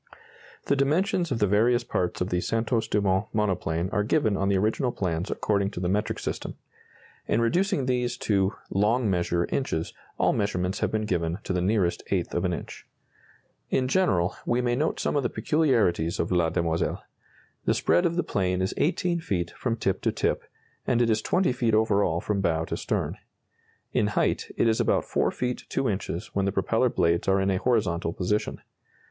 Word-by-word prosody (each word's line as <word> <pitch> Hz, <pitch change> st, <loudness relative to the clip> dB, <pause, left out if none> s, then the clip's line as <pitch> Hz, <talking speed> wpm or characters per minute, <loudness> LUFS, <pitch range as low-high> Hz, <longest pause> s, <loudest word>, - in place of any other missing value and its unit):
The 140 Hz, -, +2 dB
dimensions 170 Hz, +5 st, +1 dB
of 125 Hz, -, +1 dB
the 105 Hz, -, +3 dB
various 115 Hz, +5 st, +3 dB
parts 90 Hz, -7 st, -2 dB
of 90 Hz, -, 0 dB
the 90 Hz, 0 st, +1 dB
Santos 115 Hz, +1 st, 0 dB
Dumont 100 Hz, 0 st, +1 dB
monoplane 90 Hz, -5 st, 0 dB
are 105 Hz, -, +1 dB
given 110 Hz, -1 st, +1 dB
on 95 Hz, 0 st, 0 dB
the 100 Hz, -, +3 dB
original 110 Hz, +6 st, +1 dB
plans 90 Hz, -3 st, -2 dB
according 100 Hz, -2 st, 0 dB
to 100 Hz, -, -7 dB
the 90 Hz, -, -1 dB
metric 105 Hz, +4 st, 0 dB
system. -, -, -4 dB, 0.7 s
In 110 Hz, -, +2 dB
reducing 170 Hz, -, +1 dB
these 125 Hz, -1 st, 0 dB
to 100 Hz, -1 st, +2 dB, 0.2 s
"long 105 Hz, +3 st, +2 dB
measure" 85 Hz, -1 st, +1 dB
inches, 80 Hz, -12 st, -2 dB, 0.2 s
all -, -, +3 dB
measurements 95 Hz, -2 st, -1 dB
have -, -, 0 dB
been 110 Hz, 0 st, -1 dB
given 85 Hz, -4 st, -1 dB
to -, -, -2 dB
the 90 Hz, -, 0 dB
nearest 95 Hz, -2 st, +1 dB
eighth -, -, -1 dB
of -, -, 0 dB
an -, -, +1 dB
inch. -, -, -7 dB, 0.8 s
In 130 Hz, -1 st, +1 dB
general, 95 Hz, -, +2 dB
we 120 Hz, -, +1 dB
may 120 Hz, -1 st, +1 dB
note 150 Hz, +5 st, 0 dB
some -, -, -1 dB
of 145 Hz, -, +3 dB
the 120 Hz, -, -1 dB
peculiarities 115 Hz, -, +1 dB
of 85 Hz, -, -1 dB
La 85 Hz, -2 st, +3 dB
Demoiselle. 85 Hz, 0 st, -1 dB, 0.6 s
The -, -, +2 dB
spread 175 Hz, -, +3 dB
of 170 Hz, -, -3 dB
the 175 Hz, -, +1 dB
plane 90 Hz, -2 st, 0 dB
is 95 Hz, 0 st, -1 dB
18 175 Hz, +1 st, +1 dB
feet 90 Hz, -, -2 dB
from 120 Hz, -3 st, -2 dB
tip 95 Hz, -4 st, -1 dB
to -, -, +1 dB
tip, -, -, 0 dB, 0.5 s
and 120 Hz, -, +2 dB
it 115 Hz, -, +2 dB
is 110 Hz, 0 st, +1 dB
20 180 Hz, -, +1 dB
feet 120 Hz, -3 st, +1 dB
over 110 Hz, -2 st, +3 dB
all 85 Hz, -2 st, 0 dB
from 100 Hz, -2 st, -1 dB
bow 80 Hz, -3 st, +1 dB
to -, -, -3 dB
stern. -, -, -2 dB, 0.7 s
In 105 Hz, -, +2 dB
height, 105 Hz, -, 0 dB
it -, -, +3 dB
is 110 Hz, +1 st, +2 dB
about 115 Hz, -, +2 dB
4 -, -, +1 dB
feet 125 Hz, 0 st, -3 dB
2 135 Hz, -, 0 dB
inches 95 Hz, -4 st, -3 dB
when 100 Hz, -1 st, +1 dB
the 100 Hz, -, +1 dB
propeller -, -, +1 dB
blades 85 Hz, 0 st, +1 dB
are 95 Hz, 0 st, +3 dB
in 95 Hz, 0 st, +1 dB
a 95 Hz, -, +1 dB
horizontal 90 Hz, -9 st, 0 dB
position. 105 Hz, +3 st, -1 dB
105 Hz, 195 wpm, -26 LUFS, 90-120 Hz, 0.8 s, the